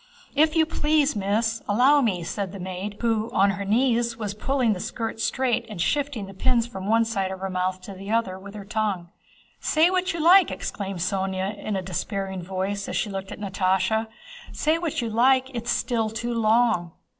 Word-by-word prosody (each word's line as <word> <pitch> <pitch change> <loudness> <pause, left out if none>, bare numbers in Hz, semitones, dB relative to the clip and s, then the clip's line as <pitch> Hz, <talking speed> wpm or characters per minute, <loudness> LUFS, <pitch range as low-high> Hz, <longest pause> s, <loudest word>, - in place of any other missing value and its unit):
"If 310 +2 +3
you 320 -1 +5
please, 300 -3 +1
Miss! 220 +3 0
allow 260 +8 +5
me," 190 -9 0
said 195 +2 -4
the 200 - -7
maid, 185 +3 -5
who 225 -1 +1
on 195 +1 +4
her 200 +1 -4
knees 235 +2 +1
was 210 -3 -3
pulling 245 +1 +1
the 185 - -5
skirt 225 +3 -4
straight 245 +1 +1
and 210 -5 -7
shifting 280 - 0
the 195 - -10
pins 230 +4 +1
from 195 -5 -7
one 225 +1 +4
side 195 -4 -1
of 190 0 -6
her 195 0 -3
mouth 185 0 -1
to 195 +2 -9
the 195 +1 -9
other 215 -4 0
with 200 +2 -11
her 205 -2 -8
tongue. 205 -5 -2 0.5
"Say 325 +3 +3
what 370 0 +1
you 335 - -4
like," 355 +3 +7
exclaimed 195 -3 -4
Sónya, 190 +2 -1
in 205 0 -4
a 190 - -2
despairing 190 +1 -3
voice 190 +3 -3
as - - -4
she 210 - -1
looked 195 0 -5
at - - -7
Natásha, 195 +2 +1 0.4
"say 315 +2 +1
what 320 -4 -2
you 230 - -2
like, 260 +3 +3
it's 235 -1 -4
still 225 -3 0
too 235 +2 -3
long." 220 -6 +2
215 Hz, 200 wpm, -25 LUFS, 195-240 Hz, 0.5 s, like